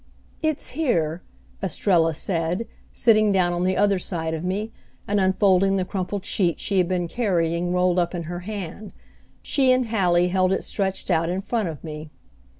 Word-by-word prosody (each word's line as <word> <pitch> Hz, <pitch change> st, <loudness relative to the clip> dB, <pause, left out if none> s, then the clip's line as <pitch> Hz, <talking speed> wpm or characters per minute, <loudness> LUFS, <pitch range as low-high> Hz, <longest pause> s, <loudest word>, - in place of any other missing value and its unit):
"It's 310 Hz, -3 st, -1 dB
here," 180 Hz, -, 0 dB, 0.4 s
Estrella 170 Hz, -3 st, +1 dB
said, 170 Hz, +5 st, -1 dB, 0.3 s
sitting 215 Hz, -3 st, +3 dB
down 180 Hz, -3 st, +2 dB
on 175 Hz, +1 st, -1 dB
the 185 Hz, 0 st, +1 dB
other 200 Hz, -2 st, +3 dB
side 165 Hz, -3 st, -3 dB
of 160 Hz, 0 st, -4 dB
me, 200 Hz, +5 st, -2 dB, 0.4 s
and 205 Hz, 0 st, +1 dB
unfolding 190 Hz, 0 st, +3 dB
the 185 Hz, -1 st, 0 dB
crumpled 190 Hz, +1 st, -4 dB
sheet 175 Hz, -5 st, 0 dB
she 195 Hz, -2 st, 0 dB
had 180 Hz, -, +2 dB
been 180 Hz, -1 st, -1 dB
carrying 175 Hz, -4 st, 0 dB
rolled 180 Hz, 0 st, +2 dB
up 175 Hz, +1 st, 0 dB
in 170 Hz, -, -3 dB
her 175 Hz, +2 st, -5 dB
hand. 200 Hz, +1 st, -7 dB, 0.5 s
She 265 Hz, -2 st, +3 dB
and 255 Hz, -2 st, +2 dB
Hallie 180 Hz, -5 st, +2 dB
held 185 Hz, 0 st, +2 dB
it -, -, -1 dB
stretched 195 Hz, -1 st, -2 dB
out 165 Hz, 0 st, +2 dB
in 185 Hz, +2 st, -1 dB
front 210 Hz, -2 st, -1 dB
of 155 Hz, -3 st, -8 dB
me. 155 Hz, -1 st, -7 dB
185 Hz, 175 wpm, -23 LUFS, 175-205 Hz, 0.5 s, sitting